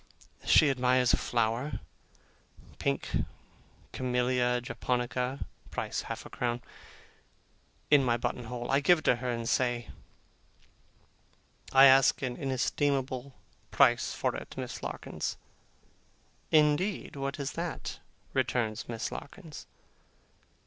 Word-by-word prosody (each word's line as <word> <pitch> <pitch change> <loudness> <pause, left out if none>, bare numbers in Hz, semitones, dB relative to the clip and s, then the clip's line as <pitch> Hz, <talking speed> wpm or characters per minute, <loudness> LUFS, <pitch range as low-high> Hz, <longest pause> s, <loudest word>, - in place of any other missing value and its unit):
She 145 - +6
admires 125 -1 +3
a - - +7
flower 120 +4 0 1.1
(pink 70 - -1 0.7
camellia 125 -1 +1
japonica, 125 +1 -2 0.2
price - - -3
half - - -6
a - - -9
crown), 120 0 -2 1.3
in 145 -2 +7
my 120 -2 +2
button 120 0 -3
hole. 120 +1 -4
I 135 - +4
give 175 +5 +5
it 155 - -9
her, 125 +1 +2
and 115 -1 -2
say: 120 -1 0 1.8
'I 135 +1 +8
ask 135 +1 +6
an 125 -2 -2
inestimable 135 0 -1 0.3
price - - +4
for - - -1
it, - - -8
Miss - - -5
Larkins.' - - -4 1.1
'Indeed! 155 +6 +2
What 140 +1 -3
is 140 0 -2
that?' 165 -4 -5 0.3
returns 120 -4 -1
Miss 115 -2 -3
Larkins. 160 +1 -9
130 Hz, 105 wpm, -30 LUFS, 120-140 Hz, 1.8 s, I